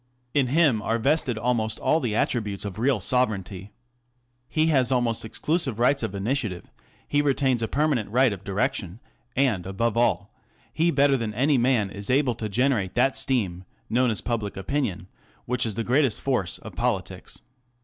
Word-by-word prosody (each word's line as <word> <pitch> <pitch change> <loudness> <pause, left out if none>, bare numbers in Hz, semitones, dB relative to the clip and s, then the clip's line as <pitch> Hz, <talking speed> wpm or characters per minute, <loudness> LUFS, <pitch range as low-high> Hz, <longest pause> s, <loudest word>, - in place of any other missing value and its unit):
In 140 -3 +2
him 140 -5 +3
are 115 +2 0
vested 130 -1 +1
almost 110 -2 0
all 160 - +2
the 120 -8 -2
attributes 105 -4 -1
of 100 0 -6
real 125 -1 +2
sovereignty. 100 -4 -1 0.8
He 155 0 +2
has 135 -5 +3
almost 120 -3 +1
exclusive 135 +2 -2
rights 125 +4 +3
of 100 - -3
initiative; 105 -3 -3 0.4
he 145 - +2
retains 135 -4 +1
a 115 - 0
permanent 140 -7 0
right 125 +1 +3
of 100 -1 -9
direction; 100 -1 -2 0.4
and, 120 -10 +1
above 105 +4 -1
all, 115 -4 +1 0.4
he 165 +2 +2
better 140 -2 +3
than 110 -3 -4
any 135 +3 +3
man 120 -5 +2
is 100 0 -6
able 130 -1 +3
to 110 -1 -5
generate 115 -4 +1
that 130 +2 +3
steam, 100 -10 -1 0.3
known 125 +2 +3
as 110 - -2
public 110 -5 -3
opinion, 100 -4 -2 0.4
which 125 -1 0
is 105 - -4
the 115 - -2
greatest 130 0 +2
force 120 -11 -1
of - - -11
politics. - - -3
120 Hz, 170 wpm, -25 LUFS, 105-135 Hz, 0.8 s, him